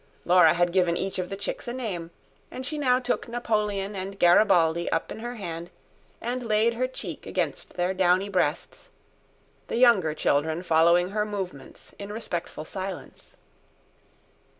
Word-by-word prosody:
Laura 180 0 +6
had 175 0 +1
given 180 -2 +2
each 190 0 -3
of 180 - -3
the 195 - -5
chicks 200 - -5
a 240 - -3
name, 195 -10 -4 0.4
and 255 - -7
she 295 +3 -3
now 250 -3 +3
took 250 -1 -2
Napoleon 210 -4 -1
and 195 +1 -5
Garibaldi 175 -2 +4
up 165 - -1
in - - -6
her 240 +2 -5
hand 170 -5 -6 0.5
and 245 +2 -3
laid 225 0 +2
her 255 +2 -1
cheek 260 - -7
against - - -3
their 180 +1 0
downy 185 +1 +2
breasts, 180 -5 -2 0.8
the - - -2
younger 205 -11 +4
children 160 +3 0
following 170 +2 +4
her 210 0 0
movements 190 -10 -7
in 200 0 -7
respectful 175 -7 -5
silence. 190 +1 -7
190 Hz, 150 wpm, -26 LUFS, 175-225 Hz, 0.8 s, Laura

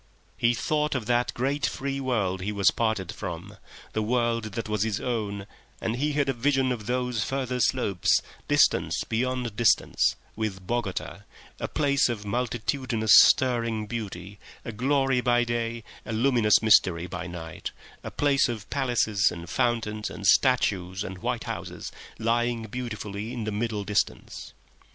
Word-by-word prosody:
He 120 +5 +2
thought 150 +3 0
of 125 -4 -2
that 120 +1 +1
great 140 +4 -1
free 140 0 -3
world 105 -8 -1
that 95 - -6
he 105 - -1
was 100 -2 +3
parted 110 -6 -1
from, 95 +2 -7 0.4
the 110 - 0
world 115 -1 0
that 115 +1 -4
was 105 -2 -1
his 110 -2 0
own, 105 -5 -3 0.3
and 110 - -2
he 150 +3 0
had 145 -1 +1
a 135 - +1
vision 130 +1 +1
of 110 -4 -4
those 125 -3 0
further 130 -2 -2
slopes, 105 -8 +2 0.3
distance - - +3
beyond 125 -1 -2
distance, 115 -4 +3 0.2
with 105 -4 -4
Bogota, 115 -3 -3 0.4
a - - -2
place 140 -3 +2
of 105 -3 -4
multitudinous 120 0 0
stirring 115 -4 +5
beauty, 100 -4 -6 0.3
a 115 - -4
glory 135 +2 +1
by 120 -1 +3
day, 115 -1 -2 0.2
a - - -5
luminous 115 -2 +3
mystery 95 -6 +4
by 90 0 -6
night, 80 -2 -6 0.3
a - - -5
place 140 -3 +2
of 110 -4 -5
palaces 115 -7 +2
and 85 0 -8
fountains 110 -4 0
and 100 - -8
statues 95 -5 +3
and 95 -2 -7
white - - -2
houses, - - -6 0.3
lying 115 +1 0
beautifully 110 -2 -5
in 120 -3 -4
the 110 - -2
middle 105 0 -2
distance. 105 0 -2
115 Hz, 155 wpm, -26 LUFS, 105-125 Hz, 0.4 s, stirring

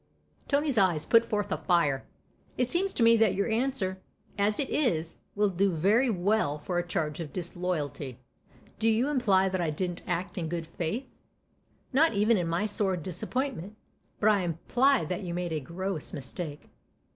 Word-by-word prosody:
Tony's 285 -4 +2
eyes 175 -6 +2
put 230 -1 +5
forth 205 -3 -2
a - - +1
fire. 155 -7 +2 0.3
" - - -34
It 250 0 0
seems 380 +3 +1
to 235 - +1
me 230 0 +7
that 215 -4 +3
your 200 - 0
answer, 220 -5 -1 0.3
as 205 +1 +1
it 280 - 0
is, 165 - 0 0.2
will 205 -1 +2
do 190 +2 +2
very 205 +10 +3
well 190 -6 +1
for 175 +4 -2
a. 175 - -3
charge 160 -4 -2
of 160 -4 -5
disloyalty. 160 -7 -4 0.6
Do 225 +1 +3
you 230 +5 +2
imply 200 -9 +3
that 185 -1 -1
I 165 - 0
didn't 175 +3 -3
act 175 +1 -2
in 165 -2 -3
good 170 -1 -3
faith? 170 +10 -3 0.5
" - - -38
"Not 300 -2 +4
even 215 +3 +4
in 175 -4 0
my 170 +5 0
sore 200 -3 0
disappointment. 200 - -3 0.4
But 215 - +4
I 210 -2 +4
imply 225 - +2
that 180 +4 -3
you 175 -3 -4
made 175 -2 -2
a 155 - 0
gross 170 +3 -5
mistake." 150 +1 -6
190 Hz, 180 wpm, -29 LUFS, 170-225 Hz, 0.6 s, me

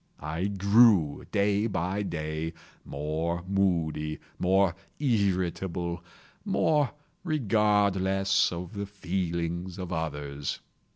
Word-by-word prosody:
I 80 +5 -3
grew, 100 -5 +4
day 100 +2 +2
by 95 0 -1
day, 80 -3 -3 0.3
more 80 +4 -2
moody, 85 -6 0 0.2
more 95 0 +3 0.3
irritable, 95 - 0 0.4
more 150 -4 +2 0.3
regardless 100 - +2
of 90 +3 -6
the 100 -1 -4
feelings 90 -2 -3
of 90 -2 -5
others. 75 -3 -3
95 Hz, 90 wpm, -28 LUFS, 85-100 Hz, 0.4 s, grew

